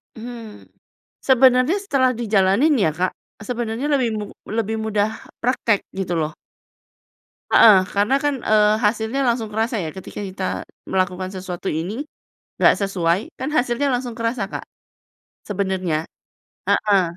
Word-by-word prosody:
Hmm, 230 -2 -9 0.6
sebenarnya 260 +4 +4
setelah 275 -11 +2
dijalanin 220 +5 +3
ya 200 - +2
Kak, 180 +4 -1 0.3
sebenarnya 235 +3 -3
lebih 260 -5 +2
mu 210 - -3 0.2
lebih 220 0 -1
mudah 215 -1 0 0.3
praktik, 230 -4 +1
gitu 180 -3 -2
loh. 155 0 -1 1.2
Heeh, 215 -3 +8 0.2
karena 205 +6 +3
kan, 290 0 +2
eee, 210 0 +5
hasilnya 220 +4 0
langsung 235 -2 0
kerasa 225 +3 -1
ya 160 - -3
ketika 190 - -8
kita 190 0 -6 0.5
melakukan 185 0 -1
sesuatu 185 0 -6
ini, 180 +6 -4 0.7
nggak - - +6
sesuai, 180 -3 +1 0.2
kan 260 +3 -2
hasilnya 250 +3 +1
langsung 245 -1 -3
kerasa 230 -1 -1
Kak, - - -5 0.8
sebenarnya. 190 -5 -1 0.7
Heeh. 200 -3 +3
220 Hz, 125 wpm, -21 LUFS, 190-245 Hz, 1.2 s, Heeh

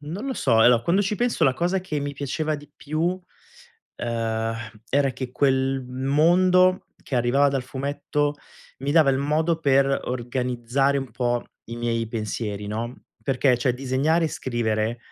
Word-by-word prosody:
non 165 - -6
lo 265 - -2
so. 115 -4 +2
Allora 120 -1 +5
quando 175 +9 +2
ci 200 +2 -1
penso 245 0 +1
la 130 -2 +3
cosa 180 +5 0
che 160 -5 -3
mi 145 0 -3
piaceva 150 +3 -2
di 145 0 -14
più, 165 +5 -2 0.8
ehm, 115 -1 -2 0.4
era 140 -1 +3
che 130 -1 -6
quel 135 0 +1
mondo 175 +8 +3 0.2
che 130 - -3
arrivava 130 +4 +3
dal 135 -2 -1
fumetto 145 +2 -2 0.4
mi 140 +2 -2
dava 155 -4 +5
il 130 - +1
modo 160 +3 +1
per 135 -1 +3
organizzare 125 +2 -1
un 135 -4 -5
po' 120 0 -1 0.2
i 115 - -7
miei 115 -1 -1
pensieri, 105 -2 -4
no. 115 +4 -4 0.3
Perché, 130 0 +2
cioè, 125 +1 +1
disegnare 135 +6 +1
e - - -2
scrivere, 115 -3 -1
135 Hz, 160 wpm, -24 LUFS, 120-150 Hz, 0.8 s, Allora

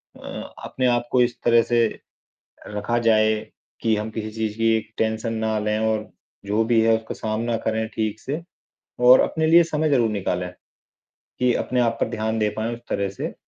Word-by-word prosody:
अ, - - -8
अपने 130 - -2
आपको 120 +1 +2
इस 120 0 +1
तरह 120 0 +5
से 120 -1 +2 0.8
रखा 105 +3 -1
जाए 110 -1 +4 0.5
कि 110 -1 +2
हम 110 +1 -3
किसी 110 0 -5
चीज़ 110 -1 -3
की 115 0 +3 0.2
टेंशन 110 +1 -1
ना 110 -1 -1
लें। 105 0 0
और 110 -1 -1 0.4
जो 105 +2 +1
भी 115 0 +3
है 115 0 +4
उसका 110 0 -7
सामना 115 +2 -2
करें 110 0 0
ठीक 110 -1 -2
से 150 +5 -4 0.7
और 130 - +9
अपने 160 0 0
लिए 170 +1 +7
समय 155 -1 -1
ज़रूर 120 -6 +3
निकालें 90 -3 -2 0.9
कि 125 -1 +3
अपने 125 -1 0
आप 115 -1 +1
पे - - +2
ध्यान 110 +1 -2
दे 105 -1 +2
पाए 110 +2 -2
उस 115 - -11
तरह 100 0 -1
से। 100 - -5
110 Hz, 185 wpm, -23 LUFS, 110-120 Hz, 0.9 s, और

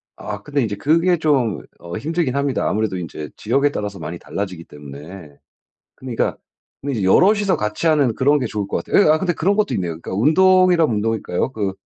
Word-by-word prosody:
아 105 -1 -6
근데 145 +5 -2
인제 105 -4 -2
그게 165 - +2
좀 135 - +1 0.2
어 85 +3 -7
힘들긴 155 +1 -1
합니다. 140 -1 0
아무래도 105 -3 -1
인제 75 -4 -6
지역에 140 +1 +1
따라서 105 -6 -5
많이 85 +1 -6
달라지기 95 -2 -5
때문에. 75 +2 -11 0.6
그러니까 125 -3 -2 0.4
근데 135 -6 -3
여럿이서 195 - +4
같이 105 +9 -3
하는 145 -7 +3
그런 145 +5 +3
게 130 - -2
좋을 105 -2 -3
것 - - -3
같아요. 205 - +3
예 - - +4
아 155 - +4
근데 180 +1 0
그런 190 +5 0
것도 210 -1 +1
있네요. 85 -3 -2
그러니까 - - -6
운동이라면 175 - +4
운동일까요? 110 +1 -1
그 100 -5 -2
120 Hz, 430 characters per minute, -20 LUFS, 100-155 Hz, 0.6 s, 여럿이서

